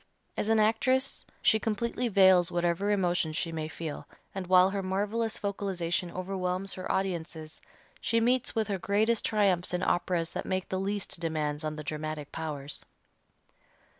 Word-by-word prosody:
As 215 - -1
an 225 0 +4
actress 255 +5 +1 0.2
she 220 - +5
completely 235 +3 -1
veils 190 -4 +5
whatever 175 +3 +1
emotions 175 -6 +1
she 165 - -1
may 160 -1 -3
feel, 160 -1 -6 0.3
and 190 -2 -4
while 185 +1 +6
her 200 0 -1
marvelous 205 +4 -1
vocalization 190 -4 -2
overwhelms 185 +1 -2
her 185 - -4
audiences, 165 -4 -3 0.4
she 230 - +1
meets 245 +2 +1
with 220 -2 +1
her 200 -2 -2
greatest 215 +4 +2
triumphs 190 -5 +2
in 180 - -2
operas 175 -2 +1
that - - -3
make 185 -1 -2
the 190 - -1
least 200 -2 -3
demands 155 -2 -2
on 155 0 -2
the 150 - -6
dramatic 150 0 -4
powers. 150 -3 -5
185 Hz, 155 wpm, -29 LUFS, 165-205 Hz, 0.4 s, while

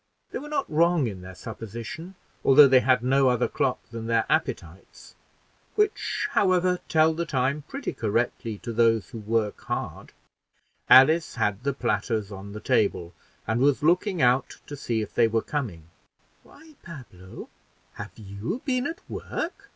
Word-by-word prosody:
They - - -4
were 295 - -9
not 290 -2 -1
wrong 165 -1 +2
in 100 -5 -5
their 95 0 -10
supposition, 115 - -8 0.3
although 140 +1 +8
they 130 -1 +6
had 125 -1 +2
no 135 +1 +3
other 125 -2 +1
clock - - -1
than 115 -1 -6
their 115 -1 +2
appetites, 85 +3 -3 0.6
which, 420 0 0
however, 180 -1 +2
tell 160 0 +4
the 170 +2 -2
time 140 +1 -1
pretty 275 -1 -5
correctly 115 0 -2
to 115 - -5
those 115 -1 +2
who 115 - -7
work 110 0 -1
hard. - - -5 0.8
Alice 155 +5 +6
had 105 -3 -1
the 140 +2 -1
platters 110 -3 -1
on 100 +1 -8
the 105 - -6
table, 90 -5 0 0.3
and 110 +3 -1
was 140 +1 +2
looking 180 +1 +2
out 125 +2 +2
to 145 - -7
see 115 -5 -2
if - - -10
they 115 - +4
were 115 0 0
coming. 115 - -4 0.6
"Why, 315 +1 -18
Pablo, 120 - -11 0.4
have - - -9
you 105 - -6
been 255 -1 0
at 335 - -8
work?" 395 +5 -6
125 Hz, 160 wpm, -25 LUFS, 110-160 Hz, 0.8 s, although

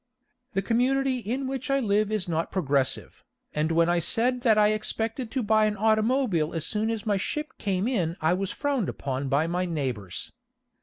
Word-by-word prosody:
The 195 - 0
community 255 +3 +1
in 245 +5 -3
which 265 0 -4
I 275 0 +3
live 210 -3 +1
is 215 -4 -1
not 165 -1 -1
progressive, 140 -7 -1 0.3
and 155 +2 0
when 165 0 +3
I 175 0 +2
said 245 +8 +2
that 225 -3 +4
I 210 0 +5
expected 225 +3 -2
to 260 +1 -2
buy 215 0 +4
an 210 -1 -1
automobile 215 - +2
as 160 - -1
soon 220 +1 -1
as 225 -3 -3
my 205 -2 +2
ship 300 - -3
came 195 +1 0
in 180 -9 0
I 160 +2 +2
was 190 +1 -1
frowned 275 -7 -1
upon 135 0 -3
by 145 +4 +2
my 175 +2 -1
neighbors. 130 - -4
210 Hz, 190 wpm, -26 LUFS, 170-235 Hz, 0.3 s, I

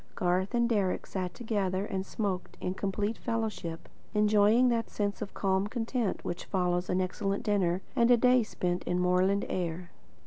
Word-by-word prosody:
Garth 185 +5 0
and 235 0 +3
Deryck 200 -6 0
sat 185 -2 -4
together 200 -5 -1
and 190 -2 -3
smoked 195 -4 -3
in 180 - -2
complete 205 +3 -2
fellowship, 220 -8 -3 0.3
enjoying 210 +3 +5
that 230 -2 0
sense 205 -1 -2
of 205 - -6
calm 190 0 +1
content 230 -1 -2
which 175 +1 -4
follows 180 -1 0
an 180 - +1
excellent 195 +2 -1
dinner 190 -4 +1
and 235 -2 +4
a 245 - +7
day 250 +1 +5
spent 180 -4 -2
in 180 - 0
moorland 180 +2 +2
air. 175 -1 -3
200 Hz, 165 wpm, -30 LUFS, 180-220 Hz, 0.3 s, a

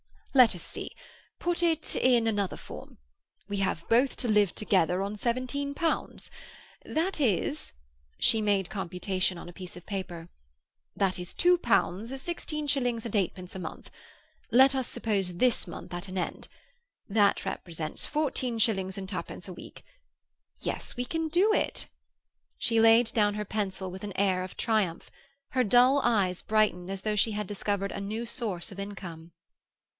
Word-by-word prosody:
"Let 250 -7 +7
us 175 - -8
see. - - -7 0.4
Put 350 0 0
it 325 -2 +2
in 245 -3 +4
another 205 -4 0
form. - - -10 0.5
We 205 - -2
have 185 -4 -1
both 250 +4 +3
to 245 - 0
live 210 -4 +3
together 185 -3 +2
on 200 +1 -3
seventeen 255 +5 -2
pounds. 330 0 -1 0.5
That 335 +3 -1
is—" 175 - 0 0.4
she 225 - +4
made 200 -3 +2
a - - -23
computation 185 -1 -1
on 170 - -9
a - - -11
piece 180 -1 -9
of 180 - -11
paper—"that 170 - -5
is 180 0 -6
two 355 0 +5
pounds, 230 - +1
sixteen 305 0 -3
shillings 245 -5 0
and 230 - -5
eightpence 185 -2 -1
a - - -4
month—let 250 +8 0
us 260 -2 -1
suppose 200 -6 -1
this 245 -2 +3
month 170 - -8
at 175 +2 -5
an 185 0 -6
end. 180 - -3 0.6
That 205 -1 +3
represents 160 -3 -3
fourteen 265 -5 -1
shillings 195 -4 +1
and 190 -1 -5
twopence 185 -1 -5
a - - -6
week. - - -12 0.8
Yes, - - -4
we 245 - -1
can 325 +4 -2
do 365 +7 +3
it!" - - 0 0.7
She 230 -1 +2
laid 225 +1 +6
down 205 -2 +3
her 210 0 -3
pencil 190 -3 -3
with 190 +2 -8
an 205 -1 -5
air 190 -2 +2
of 185 - -9
triumph. 210 -7 0 0.4
Her 255 -3 +2
dull 250 +6 +6
eyes 190 -6 +2
brightened 210 -5 +1
as 195 -1 -3
though 210 +1 -1
she 220 +2 +3
had 210 0 -2
discovered 200 -1 -2
a - - -4
new 215 +4 -3
source 215 -7 -3
of 195 - -9
income. 175 -5 -7
205 Hz, 160 wpm, -29 LUFS, 185-245 Hz, 0.8 s, Let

